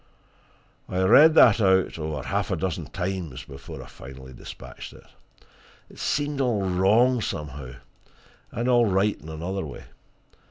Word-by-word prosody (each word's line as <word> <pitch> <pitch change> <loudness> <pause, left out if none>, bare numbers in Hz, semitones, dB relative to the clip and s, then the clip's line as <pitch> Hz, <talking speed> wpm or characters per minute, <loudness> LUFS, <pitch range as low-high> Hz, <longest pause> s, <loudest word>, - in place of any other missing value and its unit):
I 95 +1 0
read 150 +11 +7
that 115 -7 +7
over 80 -7 +1
half - - -2
a - - 0
dozen 90 -4 -3
times 90 -3 -4
before 70 0 -10
I - - -12
finally 65 0 -12
dispatched - - -10
it. - - -15 0.9
It - - -15
seemed 145 -1 -1
all 110 -7 0
wrong, 110 +7 +3
somehow 70 - -5 0.8
and 120 +1 -3
all 120 -2 +4
right 95 -2 +1
in 80 - -11
another 85 +5 -4
way. 75 - -8
95 Hz, 135 wpm, -25 LUFS, 75-115 Hz, 0.9 s, read